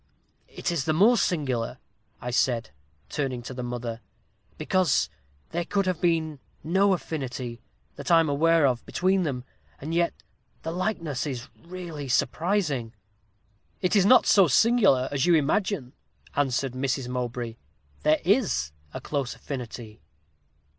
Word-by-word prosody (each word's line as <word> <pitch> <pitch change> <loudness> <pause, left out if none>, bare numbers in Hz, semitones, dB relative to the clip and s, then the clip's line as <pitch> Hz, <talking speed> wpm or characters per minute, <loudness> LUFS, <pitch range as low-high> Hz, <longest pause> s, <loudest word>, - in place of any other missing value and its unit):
'It - - -3
is 160 -6 -1
the 155 - +2
more 210 +10 +5
singular,' 130 - 0 0.4
I 125 - -4
said, 120 -2 +1 0.4
turning 130 -4 -3
to 130 - -7
her 125 - -5
mother, 120 -1 -4 0.6
'because 175 - +1 0.4
there 175 +1 -1
could 195 +3 0
have 185 -3 -1
been 160 -4 +1 0.2
no 190 +4 +3
affinity, 130 -8 -4 0.4
that - - -6
I 170 -1 +7
am 165 - +2
aware 160 +2 +3
of, 125 -3 +1
between 190 +1 +2
them, 135 -7 -2 0.4
and 155 +4 -5
yet 170 0 +1 0.5
the 160 - -3
likeness 165 - -2
is 130 -2 -5 0.2
really 170 -5 -6
surprising.' 150 - 0 0.9
'It 180 +3 +1
is 200 - +5
not 255 - +7
so 195 -3 +6
singular 195 - +4
as 140 +2 +1
you 175 - +6
imagine,' 155 -2 0 0.4
answered 135 -2 0
Mrs. 130 0 -1
Mowbray; 120 -2 -4 0.4
'there 155 +1 +3
is 185 - +2 0.2
a - - -4
close 140 -4 -2
affinity. 120 -5 -7
145 Hz, 140 wpm, -26 LUFS, 125-175 Hz, 0.9 s, I